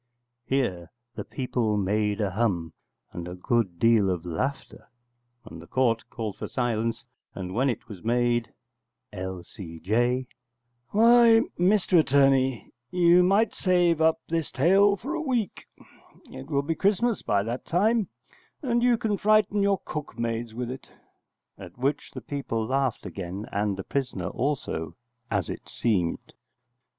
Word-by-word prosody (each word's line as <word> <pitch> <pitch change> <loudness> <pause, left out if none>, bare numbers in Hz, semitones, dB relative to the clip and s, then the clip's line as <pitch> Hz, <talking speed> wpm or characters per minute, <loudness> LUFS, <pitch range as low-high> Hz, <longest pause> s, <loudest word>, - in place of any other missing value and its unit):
[Here 95 -11 -1 0.2
the - - -5
people 120 -5 -1
made 105 +2 0
a 100 -2 0
hum, 90 -6 -1 0.4
and 85 0 -6
a 90 - -6
good 95 -1 0
deal 115 -1 +4
of 90 -2 -2
laughter, 130 - -4 0.6
and 80 0 -10
the 85 - -13
Court 115 -1 +1
called 110 -4 -5
for - - -5
silence, 115 -2 -2 0.3
and 90 -1 -5
when 130 +6 +2
it 120 - -4
was 100 -5 -10
made] 120 0 +1 0.6
L.C.J. 95 +6 -2 0.6
Why, 230 +1 +6 0.2
Mr 185 -1 +4
Attorney, 135 -4 +2 0.2
you 175 0 +5
might 200 +5 +3
save 175 -3 +2
up 160 0 +3
this 165 -2 -1
tale 195 +8 +4
for 270 - -5
a 330 - -2
week; 245 - -2 0.6
it 130 +2 -9
will 140 -2 +1
be 165 +3 -1
Christmas 210 +6 +1
by 100 -1 +1
that 120 +4 -4
time, 210 +4 +2 0.6
and 240 -3 +1
you 245 -1 +4
can 215 -3 -1
frighten 210 -1 +3
your 200 -2 +2
cook 150 -4 -6
maids 115 -1 -3
with 125 0 -3
it 130 - -9 0.7
[at 90 0 -11
which 135 +3 -1
the - - -8
people 125 -6 -3
laughed 130 -2 -1
again, 95 +2 -6
and 100 -1 -1
the 95 - -5
prisoner 120 -10 -3
also, 125 - -3 0.3
as 100 -6 -1
it - - -7
seemed]. 95 -8 -1
125 Hz, 145 wpm, -26 LUFS, -, 0.7 s, Why